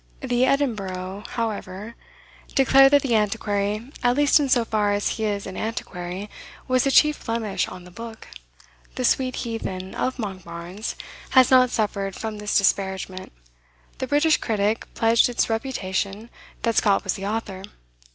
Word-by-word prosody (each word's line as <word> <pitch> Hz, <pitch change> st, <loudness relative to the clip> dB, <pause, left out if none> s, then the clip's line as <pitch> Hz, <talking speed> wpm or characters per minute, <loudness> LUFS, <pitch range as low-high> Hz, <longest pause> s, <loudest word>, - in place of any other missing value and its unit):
The 250 Hz, -1 st, +2 dB
"Edinburgh," 200 Hz, -8 st, -1 dB
however, 215 Hz, -2 st, -4 dB, 0.6 s
declared 270 Hz, 0 st, +6 dB
that 285 Hz, -, +5 dB
the 255 Hz, -4 st, 0 dB
Antiquary, 210 Hz, +2 st, -1 dB
"at 245 Hz, +1 st, +2 dB
least 290 Hz, +1 st, +5 dB
in 285 Hz, -2 st, 0 dB
so 240 Hz, -2 st, +3 dB
far 210 Hz, -2 st, +1 dB
as 205 Hz, 0 st, 0 dB
he 220 Hz, -, -2 dB
is 205 Hz, -1 st, -2 dB
an 190 Hz, -, -7 dB
Antiquary," 190 Hz, -3 st, -5 dB, 0.4 s
was 255 Hz, 0 st, +2 dB
the -, -, +3 dB
chief 300 Hz, +2 st, +4 dB
blemish 225 Hz, -3 st, -1 dB
on 185 Hz, -1 st, -9 dB
the 180 Hz, -, -14 dB
book. 225 Hz, +3 st, -9 dB, 0.7 s
The 255 Hz, -, -1 dB
"sweet 255 Hz, +1 st, +2 dB
heathen 190 Hz, -5 st, -4 dB
of 260 Hz, -, -2 dB
Monkbarns" 185 Hz, -2 st, -6 dB, 0.4 s
has 255 Hz, 0 st, +7 dB
not 255 Hz, -1 st, +6 dB
suffered 200 Hz, -4 st, -1 dB
from 220 Hz, -2 st, -5 dB
this 210 Hz, 0 st, +1 dB
disparagement. 190 Hz, -1 st, -1 dB, 0.7 s
The 260 Hz, -, -2 dB
"British 295 Hz, +3 st, +3 dB
Critic" 215 Hz, 0 st, -1 dB
pledged 225 Hz, +2 st, +4 dB
its 240 Hz, -1 st, 0 dB
reputation 215 Hz, -2 st, -3 dB, 0.3 s
that 230 Hz, -1 st, +1 dB
Scott 200 Hz, -2 st, +3 dB
was 190 Hz, -, 0 dB
the 195 Hz, 0 st, -5 dB
author. 210 Hz, -3 st, -3 dB
220 Hz, 150 wpm, -24 LUFS, 195-245 Hz, 0.7 s, has